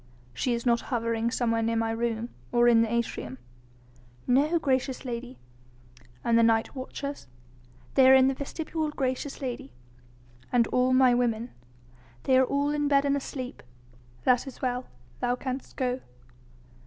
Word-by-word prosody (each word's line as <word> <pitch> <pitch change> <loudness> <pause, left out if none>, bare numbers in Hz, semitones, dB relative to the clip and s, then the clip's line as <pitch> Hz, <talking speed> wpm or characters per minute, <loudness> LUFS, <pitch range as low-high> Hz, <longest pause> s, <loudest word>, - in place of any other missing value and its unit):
"She 240 - 0
is 235 - -5
not 235 -1 +3
hovering 230 -2 0
somewhere 230 -2 0
near 230 0 0
my 225 0 0
room?... 230 0 -2 0.2
or 240 0 +4
in 230 -1 +6
the 230 -1 0
atrium?" 230 - -2 0.9
"No, 290 +7 +3
gracious 265 -4 -1
lady." 245 +1 -5 0.9
"And 230 -1 +3
the - - +6
night 225 -1 +2
watchers?" 280 - -6 0.7
"They 260 -1 +6
are 265 - +9
in 260 0 +6
the 270 - +2
vestibule, 310 +3 -3
gracious 270 0 -3
lady." 240 - -5 0.8
"And 240 -2 +4
all 250 0 +2
my 255 -1 +5
women?" 240 -1 0 0.7
"They 260 - +3
are - - +5
all 285 +2 0
in 295 -1 0
bed 280 0 +3
and 280 0 +2
asleep." 260 -2 -5 0.6
"That 250 +2 +3
is 270 - -9
well. 250 0 -2 0.3
Thou 245 0 +1
canst 260 +1 -5
go." 255 0 -1
250 Hz, 155 wpm, -27 LUFS, 235-270 Hz, 0.9 s, are